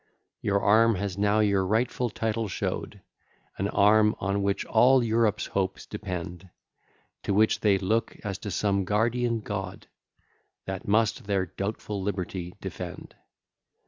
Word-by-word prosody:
Your 100 0 +1
arm 115 +2 +5
has 100 0 -3
now 105 +2 +2
your 100 -2 +2
rightful 120 +5 0
title 110 0 -2
show'd, 95 - -4 0.6
An 95 - 0
arm 105 +2 +4
on 100 +1 -1
which 100 0 0
all 125 +3 +5
Europe's 110 -2 +1
hopes 95 -1 -2
depend, 90 -3 -6 0.7
To 100 - -1
which 110 +2 +3
they 100 -2 +3
look 110 +5 -1
as 100 -3 -4
to 105 - -6
some 100 -1 0
guardian 115 +3 0
God, 95 -3 -5 0.8
That 95 -1 -5
must 110 +2 +1
their 100 -2 0
doubtful 100 +1 -4
liberty 90 -2 -4
defend. - - -7
100 Hz, 135 wpm, -27 LUFS, 95-110 Hz, 0.8 s, arm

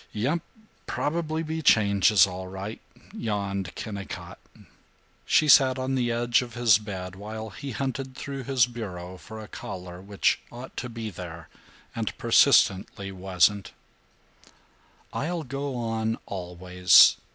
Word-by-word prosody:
"Yump, 135 +11 0 0.5
probably 160 +1 -2
be 160 0 -3
changes 100 -5 +5
all 95 -1 -6
right," 95 +4 -7 0.3
yawned 100 -4 -3
Kennicott. 100 -3 -7 0.9
She 155 - +4
sat 135 -3 +6
on 130 +1 -2
the 125 -2 +1
edge 120 +1 +2
of 120 -2 -8
his 115 -4 +5
bed 95 -3 -6
while 110 +2 -7
he 140 +8 -7
hunted 130 +1 -4
through 135 -1 -6
his 130 -3 +3
bureau 95 -7 -7
for 110 0 -10
a 110 - -9
collar 90 -3 -8
which 100 +1 +1
ought 125 +2 -10
to 125 - -4
be 115 -2 -6
there 85 -3 -9 0.5
and - - -3
persistently 95 0 +3
wasn't. 95 +1 +1 1.4
"I'll 165 +2 -2
go 140 0 -4
on, 115 -1 -1
always. 90 -1 +4
110 Hz, 130 wpm, -26 LUFS, 95-130 Hz, 1.4 s, sat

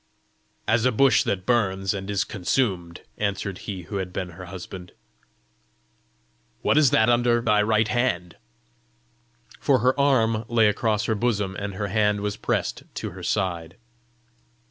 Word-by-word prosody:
"As 115 0 +2
a 125 - +4
bush 135 +3 +4
that 95 -2 -2
burns, 95 -6 +1
and 95 0 -5
is 100 -1 +1
consumed," 90 -4 -1 0.2
answered 100 -2 -2
he 95 -3 -5
who 100 +4 -5
had 95 -2 -4
been 90 0 -4
her 90 +2 -10
husband. 90 0 -9 0.8
" 60 0 -41
What - - +3
is 150 -3 +5
that 110 - +3
under 120 0 +3
thy 105 -3 +2
right 110 0 +2
hand?" 115 -9 -1 1.2
For 140 -3 +3
her 130 +3 +1
arm 115 -6 +2
lay 115 -2 +4
across 105 0 0
her 115 - +1
bosom, 105 -4 -1
and 100 -1 -5
her 100 0 -3
hand 105 0 +1
was 105 -1 -2
pressed - - -2
to - - -4
her - - -10
side. 85 -2 -2
105 Hz, 155 wpm, -24 LUFS, 95-115 Hz, 1.2 s, is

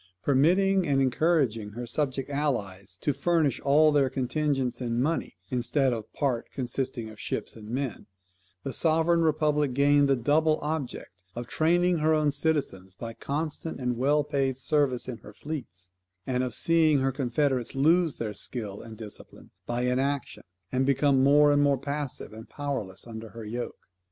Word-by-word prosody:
Permitting 180 +7 +3
and 140 -1 +2
encouraging 130 -5 +1
her 120 +2 -5
subject 135 +1 -2
allies 100 -10 -2
to 145 - +1
furnish 150 -1 +1
all 150 +2 +4
their 140 -3 +3
contingents 130 -1 -1
in 120 -1 -1
money, 150 - -1
instead 130 +2 +1
of 110 -2 -6
part 130 -5 -1
consisting 125 -2 -3
of 110 - -14
ships - - -4
and 110 -1 -11
men, 125 -4 -3 0.6
the 135 - -4
sovereign 165 +4 +2
republic 150 -4 +1
gained 145 0 +4
the 135 - +4
double 155 +5 +2
object 150 -4 -4 0.2
of 120 +1 -4
training 175 +5 +2
her 155 +1 +3
own 150 -1 +2
citizens 140 - -1
by 115 +3 -6
constant 155 +4 -4
and 125 -1 -1
well 145 +5 +2
paid 135 -2 -1
service 135 -3 0
in 120 -3 -5
her 105 0 -13
fleets, 100 - -7 0.3
and 125 -1 0
of 125 -2 -3
seeing 160 0 +4
her 135 0 +1
confederates 130 -1 -1
lose 160 +3 +3
their 110 -2 -4
skill 105 -3 -5
and 110 -1 -10
discipline 105 -2 -10 0.2
by 120 +1 -1
inaction, 135 +2 -1 0.3
and 130 +1 +1
become 140 0 +3
more 145 +2 +6
and 145 0 +3
more 140 -1 +3
passive 140 -3 -4
and 110 +1 -11
powerless 130 -10 -4
under 115 -1 -8
her 115 0 -9
yoke. 120 +3 -6
135 Hz, 160 wpm, -27 LUFS, 120-150 Hz, 0.6 s, more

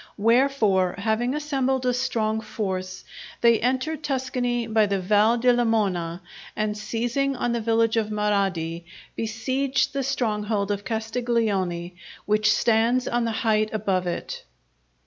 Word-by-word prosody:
Wherefore, 220 -5 +2
having 225 +5 0
assembled 270 -3 -1
a 250 - +2
strong 220 -3 -1
force, 190 -4 -4 0.4
they 235 -1 +5
entered 260 +5 -1
Tuscany 250 -3 -1
by 220 -1 +2
the 200 -1 0
Val 210 +5 +3
di 250 +2 +2
Lamona, 195 -8 0 0.3
and 215 0 -1
seizing 240 +6 -1
on 245 -1 -1
the 235 -1 -1
village 225 0 +2
of 220 -1 0
Marradi, 195 -6 -1 0.3
besieged 260 +5 -1
the 275 - -1
stronghold 210 -6 -1
of 205 0 -2
Castiglione 220 -6 -1 0.3
which 210 0 +3
stands 235 +2 +2
on 240 0 0
the 230 - -1
height 215 -1 +2
above 190 -4 0
it. 175 - -4
225 Hz, 130 wpm, -24 LUFS, 205-245 Hz, 0.4 s, they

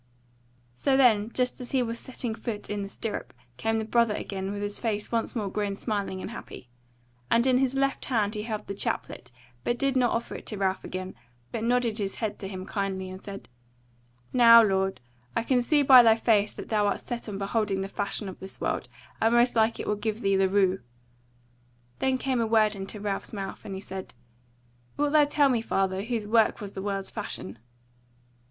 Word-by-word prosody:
So 265 - +1
then, 225 -5 +4
just 250 0 -1
as 245 - -5
he 260 -2 +2
was 230 0 -3
setting 250 -3 -4
his - - -13
foot 215 -4 -4
in 205 0 -2
the 195 - -5
stirrup, 210 - -5 0.2
came 225 +6 0
the 220 - -2
Brother 230 -1 +2
again, 195 -1 -4
with 205 0 -4
his 205 0 -3
face 210 -3 -2
once 230 +1 -1
more 215 -4 -1
grown 200 0 -2
smiling 200 -3 -3
and - - -5
happy; 125 - -10 0.6
and 235 +1 +4
in 255 -1 +4
his 265 0 +1
left 275 0 0
hand 215 -5 +1
he 210 - -3
held 215 -1 -4
the 200 - -4
chaplet, 195 - -3 0.3
but 240 - 0
did 275 0 +1
not 250 -2 +4
offer 230 - -2
it - - -8
to 210 - -3
Ralph 190 -1 0
again, 185 0 -5 0.4
but 225 - -3
nodded 240 -2 +1
his 195 -1 -2
head 220 -3 -3
to 195 - -5
him 185 -1 -6
kindly, 190 -2 -3
and 185 0 -9
said: 195 -1 -8 0.9
"Now, 230 -2 +9
lord, 190 - 0 0.3
I - - +1
can 250 +1 +2
see 290 +4 +3
by 260 -2 +10
thy 225 -2 +6
face 215 -2 +2
that - - -9
thou 210 -2 +2
art 200 - -2
set 235 -2 -4
on 200 - -4
beholding 200 -1 0
the 195 - -3
fashion 200 +1 -3
of 190 - -8
this 190 - -8
world, - - -2 0.3
and 225 +1 +4
most 240 +1 +4
like 225 0 +2
it - - -3
will - - +1
give 215 +2 -3
thee 195 0 +2
the 190 0 +3
rue." 190 -1 +3 1.2
Then 265 -1 +2
came 255 -2 0
a 225 - +1
word 215 -1 +3
into 195 +2 -6
Ralph's 200 +1 -3
mouth, 195 -2 -6
and 195 - -5
he 190 - -6
said: 190 -5 -8 0.8
"Wilt 290 0 +1
thou 300 -1 +6
tell 290 0 +3
me, 240 -3 +2
father, 190 -3 0
whose 225 0 -2
work 220 +1 +3
was 200 -2 -7
the 190 - -5
world's 195 -1 -3
fashion?" 95 +4 -6
215 Hz, 210 wpm, -27 LUFS, 195-235 Hz, 1.2 s, by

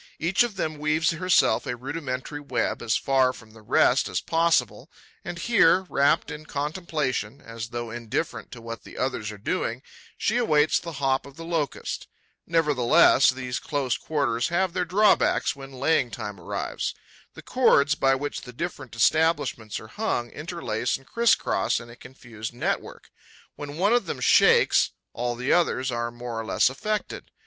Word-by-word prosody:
Each 170 +4 +1
of 240 -4 +1
them 155 -5 -3
weaves 155 +3 +2
herself 165 -9 +2
a 125 - -2
rudimentary 135 +1 -5
web, 145 - -2
as 110 - +1
far 130 -2 +2
from 115 -3 -14
the 110 0 -16
rest 105 - +3
as - - -1
possible, 165 -8 +1 0.3
and 175 - -6
here, 190 -3 +4
rapt 140 +1 +2
in 150 +1 -8
contemplation, 145 - -3
as 115 0 -7
though 120 -1 -5
indifferent 120 +7 -4
to 120 - -10
what 115 0 -7
the - - -13
others 125 -5 -2
are 105 - -9
doing, 120 - -2 0.3
she 230 - 0
awaits 155 -11 +3
the 170 -2 -7
hop 135 -1 0
of 140 - -14
the 165 +1 -9
Locust. 165 -5 -3 0.4
Nevertheless, 145 -5 +4
these 130 -1 -3
close 140 -5 -1
quarters 135 -7 -1
have 175 +1 0
their 180 -1 0
drawbacks 205 -3 +3
when 135 0 -10
laying 130 -1 +1
time 105 -2 -6
arrives. 85 - -4 0.4
The - - -11
cords 155 - +3
by 135 -2 +2
which 145 +2 -4
the 125 - -11
different 135 -4 -6
establishments 145 -4 +1
are - - -11
hung 120 - -2
interlace 145 -8 -3
and 135 - -21
criss 235 +7 +3
cross - - 0
in 115 0 -11
a - - -12
confused 120 -3 -9
network. 120 - -3 0.4
When 145 +1 -7
one 200 +6 +3
of 245 - +2
them - - -4
shakes, 475 +1 +4 0.2
all 120 0 -2
the 125 +2 0
others 130 -7 +1
are 120 0 -2
more 120 -1 -6
or 115 - -5
less - - +3
affected. 210 +10 -4
140 Hz, 170 wpm, -25 LUFS, 120-165 Hz, 0.4 s, here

